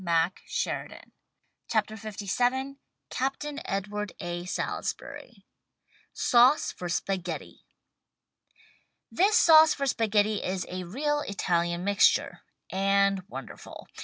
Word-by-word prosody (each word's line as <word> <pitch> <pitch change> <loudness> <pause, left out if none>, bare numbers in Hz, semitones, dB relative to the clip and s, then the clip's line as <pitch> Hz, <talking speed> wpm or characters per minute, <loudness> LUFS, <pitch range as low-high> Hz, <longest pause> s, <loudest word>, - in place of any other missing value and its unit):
THE 170 0 +2 0.2
STAG - - -2 0.8
COOK 220 -2 +2
BOOK 220 0 -9
LVII 245 +6 -2 0.3
Captain 280 +2 -3
Edward 205 0 -3
A, 175 0 -5
Salisbury 180 - -5 0.7
SAUCE 255 +4 +4
FOR 175 - -7
SPAGHETTI 180 -1 -3 1.5
This 410 +5 +3
sauce 315 -1 +7
for 280 - -2
spaghetti 215 -4 +1
is 185 0 -2
a 185 0 -5
real 295 - -1
Italian 175 -3 -1
mixture 200 +1 +2 0.2
— - - -56
and 195 0 +2
wonderful. - - -10
205 Hz, 105 wpm, -27 LUFS, 185-260 Hz, 1.5 s, sauce